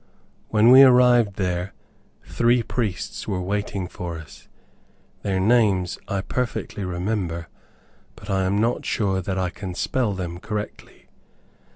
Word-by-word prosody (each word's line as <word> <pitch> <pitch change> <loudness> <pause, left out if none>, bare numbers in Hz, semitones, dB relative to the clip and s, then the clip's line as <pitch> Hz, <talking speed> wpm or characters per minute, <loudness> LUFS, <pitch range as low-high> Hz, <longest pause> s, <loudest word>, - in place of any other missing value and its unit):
When 110 +2 +5
we 130 +1 +10
arrived 125 -5 +5
there, 90 -1 -2 0.5
three 120 0 +2
priests 110 -7 -3
were 95 - -1
waiting 100 0 -3
for 85 -2 -6
us. 80 -1 -13 0.7
Their 95 -2 -1
names 100 -4 +2
I 100 -2 -1
perfectly 120 -2 -3
remember, 90 -2 -3 0.7
but 100 - -13
I 95 -2 0
am 100 +2 +1
not 115 +3 0
sure 95 -4 0
that 95 +1 -3
I 90 -2 -1
can 90 -2 -7
spell 120 +1 0
them 90 -2 -5
correctly. 105 0 -7
100 Hz, 135 wpm, -23 LUFS, 90-110 Hz, 0.7 s, we